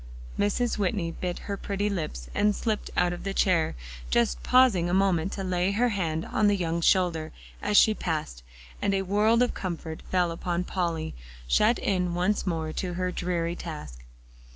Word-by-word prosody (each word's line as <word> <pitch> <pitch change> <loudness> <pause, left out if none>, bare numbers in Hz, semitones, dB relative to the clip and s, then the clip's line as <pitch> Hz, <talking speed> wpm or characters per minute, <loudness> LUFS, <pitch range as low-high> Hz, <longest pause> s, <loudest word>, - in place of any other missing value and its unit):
Mrs. 215 +3 +1
Whitney 185 -4 0
bit 175 +1 -4
her 200 - -2
pretty 200 +1 -2
lips 155 - -4
and 210 0 +2
slipped 220 -3 -2
out 175 0 +3
of 175 - -7
her 195 - -3
chair, 175 -5 +2 0.3
just - - +1
pausing 215 - +4
a 180 - +1
moment 190 -2 +2
to 195 - -4
lay 185 +1 0
her 245 +4 +2
hand 165 -6 -1
on 210 - +1
the 205 -1 +3
young 170 -2 -1
shoulder 165 -3 +2 0.3
as 210 0 +2
she 220 - +7
passed, 155 - -3 0.4
and 200 - +1
a 195 - 0
world 215 +5 +3
of 245 - 0
comfort 165 -3 -5
fell 180 -2 +2
upon 175 +1 -2
Polly, 170 -4 -2 0.3
shut 215 - +4
in 180 -3 0
once 185 +3 0
more 160 -3 -2
to 180 -2 -3
her 180 0 -1
dreary 175 -1 -2
task. 150 - -8
180 Hz, 175 wpm, -27 LUFS, 165-200 Hz, 0.4 s, she